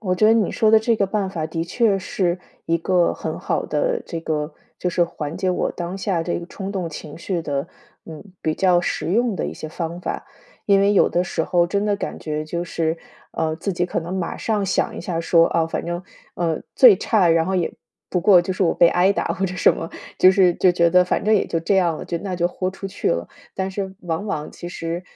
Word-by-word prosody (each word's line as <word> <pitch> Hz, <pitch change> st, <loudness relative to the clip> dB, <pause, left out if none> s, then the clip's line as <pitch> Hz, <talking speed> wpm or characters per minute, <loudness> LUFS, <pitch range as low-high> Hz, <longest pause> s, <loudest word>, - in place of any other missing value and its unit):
我 185 Hz, -4 st, 0 dB
觉 215 Hz, +4 st, +3 dB
得 220 Hz, -, +6 dB
你 220 Hz, -5 st, +2 dB
说 215 Hz, -1 st, +2 dB
的 220 Hz, -, +7 dB
这 225 Hz, 0 st, +1 dB
个 200 Hz, -, +1 dB
办 195 Hz, -1 st, -1 dB
法 160 Hz, -4 st, -3 dB
的 165 Hz, +1 st, -3 dB
确 200 Hz, +2 st, +1 dB
是 180 Hz, -1 st, -1 dB, 0.3 s
一 165 Hz, -, +2 dB
个 175 Hz, +1 st, +2 dB
很 -, -, -5 dB
好 -, -, -1 dB
的 -, -, 0 dB
这 165 Hz, -2 st, -5 dB
个， 150 Hz, -1 st, -3 dB, 0.2 s
就 180 Hz, -, -1 dB
是 175 Hz, 0 st, +2 dB
缓 155 Hz, -2 st, -6 dB
解 185 Hz, -, -1 dB
我 180 Hz, -, 0 dB
当 175 Hz, +2 st, -5 dB
下 190 Hz, -4 st, -1 dB
这 175 Hz, 0 st, -2 dB
个 170 Hz, -, -8 dB
冲 195 Hz, +2 st, -6 dB
动 185 Hz, -4 st, -2 dB
情 150 Hz, -1 st, -8 dB
绪 175 Hz, +1 st, -3 dB
的， 145 Hz, +2 st, -3 dB, 0.4 s
嗯， 160 Hz, +3 st, -9 dB, 0.2 s
比 155 Hz, -, 0 dB
较 180 Hz, -1 st, +3 dB
实 -, -, -2 dB
用 220 Hz, +3 st, +1 dB
的 -, -, -2 dB
一 -, -, -5 dB
些 155 Hz, -, -7 dB
方 170 Hz, +1 st, -5 dB
法。 -, -, -4 dB, 0.4 s
因 200 Hz, -1 st, +5 dB
为 200 Hz, +1 st, +4 dB
有 200 Hz, -, +4 dB
的 175 Hz, +1 st, 0 dB
时 165 Hz, -, -2 dB
候 175 Hz, +1 st, +2 dB
真 200 Hz, +3 st, -1 dB
的 205 Hz, -1 st, +1 dB
感 -, -, -5 dB
觉 155 Hz, 0 st, -3 dB
就 170 Hz, +2 st, -3 dB
是， 165 Hz, -1 st, -1 dB, 0.4 s
呃， 160 Hz, -1 st, -1 dB
自 195 Hz, +4 st, -3 dB
己 175 Hz, +1 st, -1 dB
可 -, -, -2 dB
能 170 Hz, +3 st, -5 dB
马 185 Hz, -3 st, -3 dB
上 215 Hz, -3 st, -1 dB
想 190 Hz, -, 0 dB
一 -, -, -5 dB
下 170 Hz, -1 st, -3 dB
说， 165 Hz, 0 st, +4 dB
啊， 165 Hz, -1 st, +1 dB
反 165 Hz, -, -4 dB
正， 175 Hz, +1 st, -4 dB, 0.3 s
呃， 165 Hz, -2 st, -1 dB, 0.2 s
最 235 Hz, -7 st, +8 dB
差 200 Hz, -3 st, +2 dB
然 165 Hz, 0 st, +4 dB
后 190 Hz, +1 st, -1 dB
也， 175 Hz, -, 0 dB, 0.4 s
不 180 Hz, -, 0 dB
过 185 Hz, -1 st, +6 dB
就 175 Hz, +2 st, -3 dB
是 190 Hz, -, -1 dB
我 170 Hz, -, +3 dB
被 170 Hz, -, +5 dB
挨 180 Hz, +3 st, +3 dB
打， -, -, -2 dB
或 195 Hz, -, -2 dB
者 180 Hz, -1 st, -3 dB
什 -, -, +4 dB
么。 165 Hz, -, -6 dB, 0.3 s
就 185 Hz, -, +7 dB
是 185 Hz, -2 st, +4 dB
就 185 Hz, -, +4 dB
觉 170 Hz, -1 st, +3 dB
得 180 Hz, +1 st, +5 dB
反 180 Hz, -, -1 dB
正 215 Hz, +1 st, +4 dB
也 200 Hz, -, +3 dB
就 165 Hz, -, -2 dB
这 180 Hz, +5 st, 0 dB
样 175 Hz, -4 st, +2 dB
了， -, -, -7 dB
就 170 Hz, -, -3 dB
那 185 Hz, -1 st, -4 dB
就 175 Hz, 0 st, +2 dB
豁 185 Hz, +1 st, -3 dB
出 195 Hz, +1 st, -7 dB
去 190 Hz, -, -2 dB
了。 -, -, -1 dB, 0.3 s
但 190 Hz, 0 st, -2 dB
是 190 Hz, 0 st, -4 dB
往 175 Hz, +3 st, -3 dB
往 155 Hz, -7 st, -3 dB
其 175 Hz, -, -8 dB
实， 170 Hz, 0 st, -4 dB
180 Hz, 270 characters per minute, -22 LUFS, 165-195 Hz, 0.4 s, 最